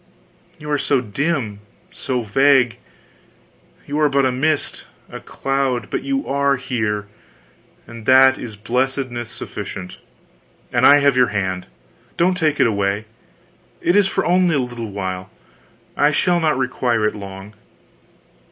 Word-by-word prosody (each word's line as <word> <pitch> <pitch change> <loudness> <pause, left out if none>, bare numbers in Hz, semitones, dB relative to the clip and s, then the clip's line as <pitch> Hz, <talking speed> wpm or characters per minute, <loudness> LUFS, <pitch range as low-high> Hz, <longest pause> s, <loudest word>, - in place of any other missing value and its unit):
You 150 0 -7
are 145 - +1
so 140 -1 +2
dim, 125 -2 -2 0.3
so 125 -2 -3
vague, 130 +1 +3 1.1
you 145 +2 -3
are 150 -1 +4
but 140 -1 +2
a 130 - +2
mist, 150 +4 -1 0.3
a - - -7
cloud, 135 -4 -2
but - - -1
you 275 0 -2
are 140 0 +2
here, 110 -5 -2 0.8
and 115 -2 -11
that 130 0 +6
is 115 -4 -7
blessedness 125 +1 -2
sufficient; 90 -1 -7 0.7
and - - +5
I 145 0 +7
have 140 -2 +3
your 125 -1 +4
hand; 95 -4 -3 0.5
don't 180 +2 +3
take 155 -4 0
it - - +5
away 100 -1 0 0.7
it 175 - +1
is 205 -1 +5
for 195 - -1
only 180 -2 +3
a - - +2
little 120 -3 -4
while, 95 -1 -5 0.7
I 145 - +4
shall 175 +4 +2
not 155 -4 +1
require 125 -3 0
it 105 - +1
long.... 100 0 -9
130 Hz, 145 wpm, -20 LUFS, 110-145 Hz, 1.1 s, I